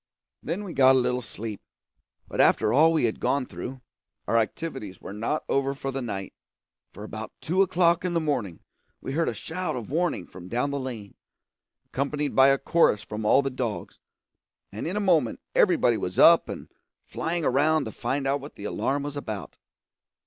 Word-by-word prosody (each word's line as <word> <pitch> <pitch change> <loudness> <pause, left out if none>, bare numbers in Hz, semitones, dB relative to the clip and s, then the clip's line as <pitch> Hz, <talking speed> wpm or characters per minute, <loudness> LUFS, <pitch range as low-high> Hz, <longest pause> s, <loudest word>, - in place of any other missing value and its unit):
Then 175 +7 -3
we 185 -4 -6
got 130 -1 +6
a - - +5
little 125 0 0
sleep. 110 -1 -7 0.7
But - - 0
after 105 - +4
all 160 +5 +6
we 160 -4 +1
had 110 - -1
gone 140 -2 +1
through, 130 +1 -7 0.5
our - - +1
activities 115 - -2
were - - -8
not 115 +9 -2
over 140 0 0
for 135 0 -4
the 135 0 -3
night; 100 -5 -5 0.6
for - - -10
about - - -7
two 180 +5 +1
o'clock 175 -2 +3
in 180 -1 -1
the - - +3
morning 125 - -2 0.4
we - - -6
heard 165 +4 +1
a - - -3
shout 180 +3 -4
of 120 -1 -6
warning 170 - 0
from 90 -1 -12
down 125 +7 -1
the 140 - -2
lane, 115 -6 -6 0.7
accompanied 145 +2 -2
by 135 0 +7
a 135 0 +5
chorus 135 -8 +2
from 105 0 -5
all 135 +6 +5
the 135 - -2
dogs, 120 -4 -4 0.7
and 105 +9 -5
in 185 +5 -2
a - - +2
moment 170 - +2
everybody - - +4
was - - -4
up - - +7
and - - -7 0.3
flying 165 -1 -2
around 155 +4 +3
to - - -5
find 135 0 -2
out 140 +1 0
what 145 - -10
the 100 - -10
alarm 140 +6 -1
was 145 0 -5
about. 110 -9 -6
135 Hz, 190 wpm, -26 LUFS, 115-160 Hz, 0.7 s, by